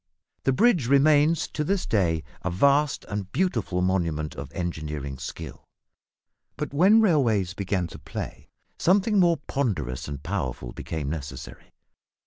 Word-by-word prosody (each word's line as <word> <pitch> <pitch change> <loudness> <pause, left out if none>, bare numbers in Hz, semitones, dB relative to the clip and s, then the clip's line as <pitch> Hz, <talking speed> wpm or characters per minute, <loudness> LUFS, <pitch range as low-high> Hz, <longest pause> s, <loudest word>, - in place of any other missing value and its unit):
The - - +4
bridge 180 - +3
remains 145 +4 +4
to 150 - -2
this 190 +4 0
day 85 -7 +1 0.2
a 95 - -2
vast 140 +10 +2
and 100 -2 -4
beautiful 115 - 0
monument 85 -5 0
of - - -8
engineering 75 -6 -4
skill. 70 -2 -7 0.9
But - - -4
when 195 +9 +6
railways 115 - +2
began 95 -2 -1
to - - -10
play, - - -7 0.3
something 200 +3 +3
more 170 -2 +4
ponderous 80 - -2
and 70 0 -6
powerful 65 -9 -3
became 80 -4 -5
necessary. 70 -3 -7
100 Hz, 130 wpm, -26 LUFS, -, 0.9 s, when